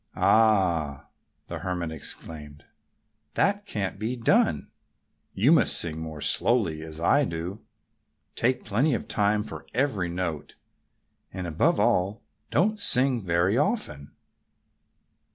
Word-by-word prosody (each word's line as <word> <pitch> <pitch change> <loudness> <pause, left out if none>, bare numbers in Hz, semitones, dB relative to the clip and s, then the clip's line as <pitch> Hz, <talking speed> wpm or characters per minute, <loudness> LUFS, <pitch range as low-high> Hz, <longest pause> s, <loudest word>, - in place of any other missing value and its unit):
"Ah!" 90 - +2 0.4
the - - -7
Hermit 90 -3 -3
exclaimed. 75 -1 -4 0.7
"That 200 +1 0
can't 100 - -4
be 115 +4 -2
done. 115 -2 +1 0.6
You - - +3
must - - +5
sing 80 -2 +2
more 80 -2 -7
slowly, 95 -10 +1
as 80 0 -8
I 145 - +3
do. 90 0 -5 0.7
Take 125 +2 0
plenty 125 +7 +1
of 110 - -6
time 105 -1 +1
for - - -10
every 115 -10 0
note. 85 -3 -4 0.8
And 90 -1 -6
above 80 -3 +1
all, 95 +4 +1 0.3
don't 210 +7 +1
sing 130 - +3
very 90 +5 +1
often!" 150 - -2
95 Hz, 115 wpm, -26 LUFS, 80-120 Hz, 0.8 s, must